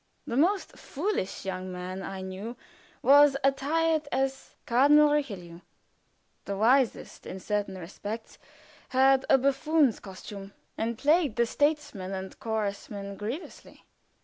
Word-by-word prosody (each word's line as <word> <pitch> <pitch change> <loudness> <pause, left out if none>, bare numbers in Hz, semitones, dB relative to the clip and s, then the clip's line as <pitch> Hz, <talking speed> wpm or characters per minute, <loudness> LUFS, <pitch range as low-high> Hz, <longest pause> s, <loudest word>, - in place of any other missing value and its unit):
The 235 - -4
most 370 +9 +1
foolish 300 - -3
young 185 -1 -4
man 180 +1 -6
I 195 0 -6
knew 190 +6 -6 0.5
was 285 0 +7
attired 310 +3 +1
as 270 0 -2
Cardinal 290 +5 +5
Richelieu; 195 - -3 0.9
the 200 0 -3
wisest, 245 +4 +1
in 190 - -6
certain 205 0 -2
respects, 205 +5 -7 0.5
had 265 +1 +4
a 270 - +7
buffoon's 280 0 +2
costume, 195 0 -10 0.2
and 230 0 -2
plagued 300 -3 +2
the 235 - +3
statesman 285 -9 -1
and 190 0 -6
churchman 200 -2 -3
grievously. 230 - -7
235 Hz, 120 wpm, -28 LUFS, 195-285 Hz, 0.9 s, was